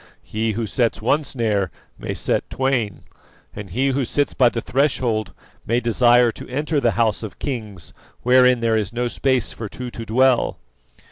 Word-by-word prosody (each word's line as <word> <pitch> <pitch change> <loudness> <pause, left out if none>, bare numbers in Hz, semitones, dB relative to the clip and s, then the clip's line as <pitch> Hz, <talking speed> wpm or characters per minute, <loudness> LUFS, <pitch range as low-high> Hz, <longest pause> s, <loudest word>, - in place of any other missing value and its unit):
He 110 0 -2
who 115 +2 -2
sets 115 +2 0
one 145 +8 +1
snare 110 - -1 0.3
may - - -4
set - - -1
twain, 130 -7 -1 0.5
and 100 -2 -7
he 130 +9 0
who 135 0 0
sits 145 +4 0
by 125 -3 +4
the 120 - -3
threshold 120 -6 0 0.3
may 115 +2 +1
desire 120 0 +4
to - - -11
enter 145 +3 -1
the 120 -4 +2
house 115 -3 +1
of 110 -3 -7
kings 105 - -5 0.3
wherein 125 -1 +5
there 115 -1 +2
is 105 -3 -1
no 120 +1 -1
space 130 0 0
for 110 -3 -6
two 125 +2 -7
to 115 - -7
dwell." 125 +3 +2
120 Hz, 175 wpm, -21 LUFS, 110-130 Hz, 0.5 s, wherein